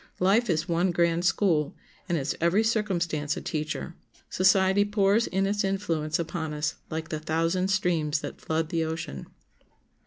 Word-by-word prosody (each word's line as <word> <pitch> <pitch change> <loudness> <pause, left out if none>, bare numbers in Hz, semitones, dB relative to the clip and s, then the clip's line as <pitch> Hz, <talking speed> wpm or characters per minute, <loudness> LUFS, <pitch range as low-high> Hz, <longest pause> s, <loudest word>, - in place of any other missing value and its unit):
Life 200 +6 +3
is 160 -3 0
one 170 +2 +1
grand 170 0 +1
school, 170 -5 +2 0.3
and 170 - +1
its 140 -1 -1
every 175 +6 +3
circumstance 175 -9 0
a - - -4
teacher. 155 +2 -4 0.4
Society 190 +1 +4
pours 205 +2 +2
in 190 +1 0
its 205 +1 0
influence 170 -6 -1
upon 160 -2 -3
us 150 0 -1 0.2
like 160 0 -4
the 155 -3 -3
thousand 165 +4 0
streams 170 -6 +1
that - - -7
flood 160 0 -1
the 165 -1 0
ocean. 160 - -5
170 Hz, 155 wpm, -27 LUFS, 160-195 Hz, 0.4 s, Society